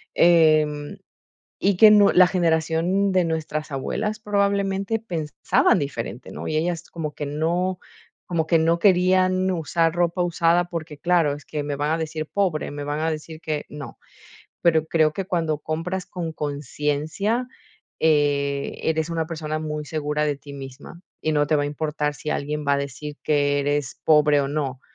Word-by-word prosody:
Em, 155 -3 +3 0.6
y 195 -1 +2
que 215 +2 +8
no 205 -1 +6
la 185 0 +7
generación 170 +3 +1
de 185 -1 +3
nuestras 155 -2 -3
abuelas 210 +11 -2
probablemente 200 0 0
pensaban 165 -4 +1
diferente, 130 -4 -5
¿no? - - -6
Y 155 - -1
ellas 170 +1 -2
como 155 -3 -5
que 145 - -4
no 175 +5 -1 0.5
como 165 -3 -1
que 165 0 +3
no 165 +1 +2
querían 185 0 +3
usar 165 -1 0
ropa 175 +1 +1
usada, 175 0 +2
porque 160 -3 -6
claro 170 -4 +2
es 145 - -11
que: 150 -1 -3
"Me 145 -1 -3
van 150 +2 0
a 165 - 0
decir 155 -1 -4
pobre, 185 -7 -1
me 145 0 -6
van 145 +1 -3
a 160 +1 0
decir 155 +1 -6
que, 155 -2 -3
no". 145 -2 -9 0.6
Pero 160 -2 +3
creo 155 -1 +2
que 195 - -3
cuando 165 -5 0
compras 165 +5 -3
con 170 -3 -5
conciencia, 150 - -2 0.5
eh, 145 -2 +1
eres 160 0 0
una 165 -1 -1
persona 155 -2 -4
muy 150 -1 -4
segura 150 -1 -1
de 145 - -1
ti 140 +1 -12
misma, 135 +5 -10 0.2
y 155 - 0
no 145 -1 +2
te 155 +1 +2
va 145 - +1
a - - -1
importar 150 0 -2
si 150 - -8
alguien 150 +1 -2
va 140 - +4
a - - 0
decir 140 +1 -6
que 145 -1 +2
eres 145 -1 -1
pobre 150 -2 +5
o 135 - -2
no, 140 -3 -3
155 Hz, 175 wpm, -23 LUFS, 150-175 Hz, 0.6 s, que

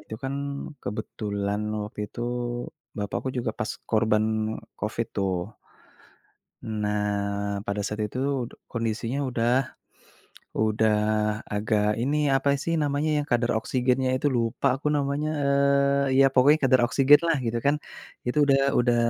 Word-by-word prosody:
Itu 110 - -8
kan 135 +1 -2 0.5
kebetulan 105 -1 -3 0.2
waktu 105 - -8
itu, - - -9 0.8
bapakku 105 +5 -3
juga 120 -2 -1
pas 110 - -2 0.2
korban 110 0 +1 0.2
Covid 110 +2 -2
tuh. 95 -2 +1 1.3
Nah, 105 -1 -2
pada 100 +1 -2
saat 105 +1 -4
itu 125 - -7 0.5
kondisinya 115 +3 -2
udah 120 -1 0 1.1
udah 110 0 +2 0.6
agak 105 0 +1 0.2
ini 140 +4 +1 0.2
apa 140 +1 +1
sih 165 - -1
namanya, 145 +2 0
yang - - -8
kadar 120 0 +2
oksigennya 130 0 +1
itu 145 - +1
lupa 115 +4 -1
aku 145 +2 -2
namanya, 140 +2 -1 0.8
eee, 135 - +4
ya - - +7
pokoknya 145 +4 +6
kadar 130 -1 +5
oksigen 140 +4 +6
lah 165 - +3
gitu 115 +1 0
kan. 145 +1 +4 0.5
Itu 125 +4 0
udah 135 -1 +4 0.2
udah 120 -1 +3
115 Hz, 130 wpm, -26 LUFS, 105-135 Hz, 1.3 s, ya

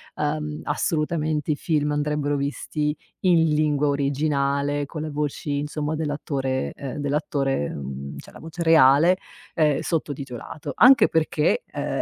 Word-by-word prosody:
uhm, 150 0 -2
assolutamente 155 -1 -1
i - - +1
film 150 -1 0
andrebbero 145 0 0
visti 150 +2 -2 0.3
in 170 -3 +4
lingua 150 -1 +2
originale, 140 0 0
con 155 -1 -6
la 155 - -4
voci 145 0 -2
insomma 150 +1 -3
dell'attore, 140 -3 -2
ehm 135 -1 -6
dell'attore, 140 - -1
mhmm, 70 0 -6
cioè - - -11
la - - -13
voce 165 +2 -6
reale, 160 +2 +6 0.4
ehm, 150 -3 +2
sottotitolato. 145 -2 -4
Anche 255 +6 +7
perché, 160 - +1
ehm, - - -3
150 Hz, 130 wpm, -24 LUFS, 140-155 Hz, 0.4 s, Anche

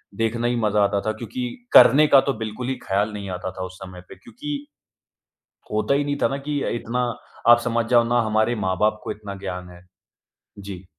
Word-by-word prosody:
देखना 115 +2 -1
ही 120 - 0
मज़ा 105 -3 +2
आता 100 0 +1
था, 110 - +1
क्योंकि 115 +3 -5 0.3
करने 150 +5 +8
का 140 - +7
तो 140 - +1
बिल्कुल 110 +2 -5
ही 130 - -1
ख्याल 100 +1 0
नहीं 100 -2 -6
आता 90 0 -4
था 95 0 -6
उस 95 0 -10
समय 90 -1 -10
पे, - - -10
क्योंकि 285 - -7 1.1
होता 110 +6 +1
ही 145 +1 +1
नहीं 145 0 -2
था - - +4
ना 135 - -3
कि 145 -1 -1
अ, - - -2
इतना 120 +1 -2 0.4
आप 120 0 +9
समझ 115 -1 0
जाओ 120 -1 +5
ना 120 0 +3
हमारे 110 +2 +1
माँ-बाप 105 +3 +1
को - - -4
इतना 105 -2 -8
ज्ञान 90 0 -5
है। 90 0 -15 0.8
जी। 95 -2 -8
110 Hz, 210 wpm, -23 LUFS, 100-125 Hz, 1.1 s, आप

